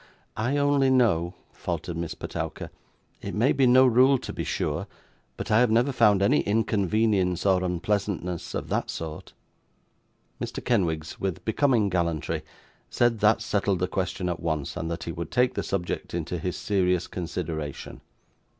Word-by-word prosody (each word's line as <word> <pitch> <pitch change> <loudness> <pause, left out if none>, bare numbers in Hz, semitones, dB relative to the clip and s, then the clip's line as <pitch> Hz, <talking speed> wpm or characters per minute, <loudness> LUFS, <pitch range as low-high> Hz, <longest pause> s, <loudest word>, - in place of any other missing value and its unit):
'I 120 +6 0
only 145 -1 +3
know 95 -9 +2
' - - -37
faltered 85 0 -4
Miss 85 0 -4
Petowker, - - -5 0.5
'it - - -5
may 120 +7 +3
be 135 -2 +3
no 130 +2 +7
rule 130 +2 +5
to - - -7
be - - -3
sure - - -2 0.5
but - - -5
I 110 - +5
have 125 -1 +4
never 120 +5 +3
found 105 -6 +4
any 100 - +4
inconvenience 100 -3 +1
or 95 -2 +3
unpleasantness 90 -1 -2
of - - -4
that - - -1
sort.' 80 -2 -6 1.1
Mr. - - -5
Kenwigs, 80 -9 0
with 95 -3 -3
becoming 115 -2 +2
gallantry, 85 -5 -1 0.5
said 120 -2 +2
that 110 +2 +3
settled 100 -4 0
the 90 +1 0
question 90 0 -2
at 85 -1 -2
once, 80 -4 -2
and 85 -2 -3
that 85 0 -4
he 85 - -4
would 85 -1 -5
take 125 +1 +2
the 100 - -2
subject 90 -3 -3
into 85 +1 -3
his 90 +3 -3
serious 90 -3 +1
consideration. 80 -4 -5
95 Hz, 160 wpm, -26 LUFS, 85-115 Hz, 1.1 s, no